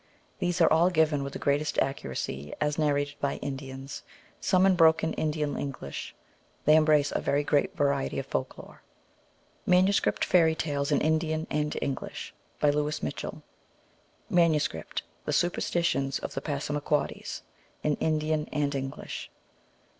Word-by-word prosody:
These 175 Hz, 0 st, 0 dB
are 165 Hz, -, +6 dB
all 170 Hz, +3 st, +5 dB
given 155 Hz, -4 st, +2 dB
with 140 Hz, 0 st, -5 dB
the -, -, -4 dB
greatest 145 Hz, +1 st, 0 dB
accuracy 70 Hz, -, -2 dB
as 150 Hz, +1 st, 0 dB
narrated 145 Hz, -1 st, 0 dB
by 140 Hz, -, 0 dB
Indians, 135 Hz, 0 st, -6 dB, 0.4 s
some 185 Hz, 0 st, +3 dB
in 190 Hz, -1 st, +5 dB
broken 160 Hz, -1 st, +4 dB
Indian 150 Hz, -2 st, -1 dB
English. 135 Hz, -, -5 dB, 0.5 s
They 155 Hz, -, +7 dB
embrace 155 Hz, -2 st, +4 dB
a -, -, -1 dB
very 145 Hz, +1 st, +1 dB
great 145 Hz, 0 st, +1 dB
variety 140 Hz, -1 st, +1 dB
of 135 Hz, -, -2 dB
folk 130 Hz, -1 st, -3 dB
lore. -, -, -12 dB, 0.9 s
Manuscript 185 Hz, +2 st, +3 dB
Fairy 165 Hz, -3 st, +4 dB
Tales 145 Hz, -2 st, -1 dB
in 145 Hz, -, +3 dB
Indian 160 Hz, 0 st, +1 dB
and 150 Hz, 0 st, -1 dB
English. 135 Hz, -2 st, -4 dB, 0.3 s
By 150 Hz, -, +4 dB
Louis 150 Hz, +1 st, -1 dB
Mitchell. -, -, -5 dB, 0.8 s
Manuscript: 160 Hz, -, +1 dB, 0.2 s
The -, -, -1 dB
Superstitions 170 Hz, -6 st, +1 dB
of -, -, -6 dB
the -, -, -3 dB
Passamaquoddies. 145 Hz, 0 st, -2 dB, 0.4 s
In 150 Hz, -, +2 dB
Indian 155 Hz, -1 st, 0 dB
and 145 Hz, -1 st, 0 dB
English. 135 Hz, -1 st, -5 dB
150 Hz, 140 wpm, -28 LUFS, 140-160 Hz, 0.9 s, They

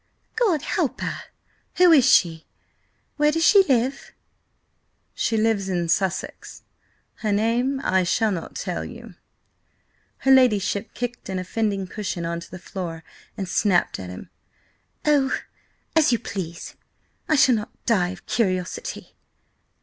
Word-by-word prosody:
"God 405 Hz, -, +1 dB
help -, -, -1 dB
her! -, -, -4 dB, 0.5 s
Who 360 Hz, -1 st, +6 dB
is 280 Hz, -7 st, +6 dB
she? 165 Hz, -3 st, +3 dB, 0.7 s
Where 295 Hz, 0 st, +4 dB
does 325 Hz, +1 st, +1 dB
she 400 Hz, -2 st, +7 dB
live?" 265 Hz, 0 st, 0 dB, 1.0 s
"She 225 Hz, -, 0 dB
lives 215 Hz, -3 st, +1 dB
in 175 Hz, -2 st, -1 dB
Sussex. 190 Hz, +1 st, -2 dB, 0.5 s
Her 215 Hz, -, -2 dB
name 235 Hz, +6 st, +1 dB
I 190 Hz, 0 st, +2 dB
shall 215 Hz, +4 st, +1 dB
not 170 Hz, -4 st, -5 dB
tell -, -, -3 dB
you." -, -, -10 dB, 1.0 s
Her 270 Hz, -, +2 dB
ladyship 220 Hz, -5 st, +3 dB
kicked 245 Hz, -3 st, -5 dB
an 190 Hz, -, -2 dB
offending 195 Hz, +1 st, -1 dB
cushion 185 Hz, -3 st, -4 dB
on 170 Hz, 0 st, -2 dB
to 170 Hz, -, -11 dB
the 185 Hz, -, -8 dB
floor, 170 Hz, -3 st, -6 dB, 0.3 s
and 195 Hz, -, -3 dB
snapped 185 Hz, -1 st, +1 dB
at 90 Hz, -1 st, -7 dB
him. 90 Hz, -, -10 dB, 0.7 s
"Oh, 285 Hz, -3 st, +3 dB, 0.6 s
as 315 Hz, -5 st, +5 dB
you 235 Hz, -, +3 dB
please! 180 Hz, -5 st, -6 dB, 0.6 s
I 310 Hz, -, +4 dB
shall 270 Hz, -3 st, +5 dB
not 215 Hz, -2 st, -5 dB
die 190 Hz, -7 st, +2 dB
of 185 Hz, -1 st, -9 dB
curiosity!" 185 Hz, -, -2 dB
210 Hz, 135 wpm, -23 LUFS, 185-260 Hz, 1.0 s, she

